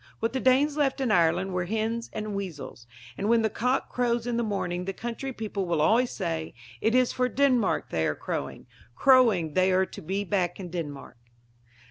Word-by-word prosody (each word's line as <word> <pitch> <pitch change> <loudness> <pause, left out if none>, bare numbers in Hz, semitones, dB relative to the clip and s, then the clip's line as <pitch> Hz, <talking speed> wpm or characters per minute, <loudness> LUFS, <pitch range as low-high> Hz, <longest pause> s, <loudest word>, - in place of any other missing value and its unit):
What 225 +1 -1
the 265 - 0
Danes 275 +4 +3
left 280 -2 +1
in 260 -4 0
Ireland 180 +1 +2
were 180 -1 -1
hens 225 +4 -2
and 215 -1 -4
weasels. 165 -11 -6 0.3
And 205 - -1
when 230 -1 +4
the 220 - +1
cock 250 +5 0
crows 240 -1 0
in 245 -1 -1
the 235 - +1
morning 180 -5 -2
the 195 - -3
country 240 +5 -5
people 210 -5 -4
will 170 -2 0
always 230 +10 +3
say: 165 -4 -4 0.3
"It 225 +2 +2
is 255 -1 +3
for 250 0 0
Denmark 255 -5 +1
they 80 -1 +1
are 75 - -1
crowing; - - -5 0.3
crowing 225 - +4
they 185 +2 +3
are 185 +1 +3
to - - -10
be 195 +5 -2
back 185 -3 -1
in 180 -3 -7
Denmark." 145 -8 -6
210 Hz, 195 wpm, -27 LUFS, 180-240 Hz, 0.3 s, when